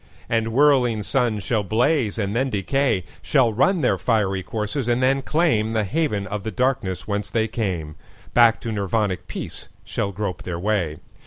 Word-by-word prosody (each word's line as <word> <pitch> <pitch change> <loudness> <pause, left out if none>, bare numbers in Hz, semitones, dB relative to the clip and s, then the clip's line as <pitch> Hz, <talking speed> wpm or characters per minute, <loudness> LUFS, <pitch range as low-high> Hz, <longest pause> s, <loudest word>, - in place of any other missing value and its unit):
And 115 -1 +1
whirling 125 -4 +3
suns 115 -4 0
shall 110 0 0
blaze 115 +3 +1
and 100 -1 -2
then 130 +3 +1
decay, 115 0 0 0.2
Shall 115 +1 +2
run 160 - +2
their 100 -8 +2
fiery 95 -1 +1
courses 110 +5 -3
and 120 +1 +1
then 135 +1 +3
claimThe 115 -9 +1
haven 135 -5 -1
of 105 0 -4
the 110 - -4
darkness 110 -5 -1
whence 105 -1 -2
they 110 +1 +1
came; 90 -9 -3 0.4
Back 120 -2 +5
to 115 - -4
Nirvanic 100 -3 -1
peace - - -7 0.2
shall 100 - -2
grope 100 -2 -4
their 90 -2 -4
way. 90 -5 -1
110 Hz, 165 wpm, -23 LUFS, 100-125 Hz, 0.4 s, Back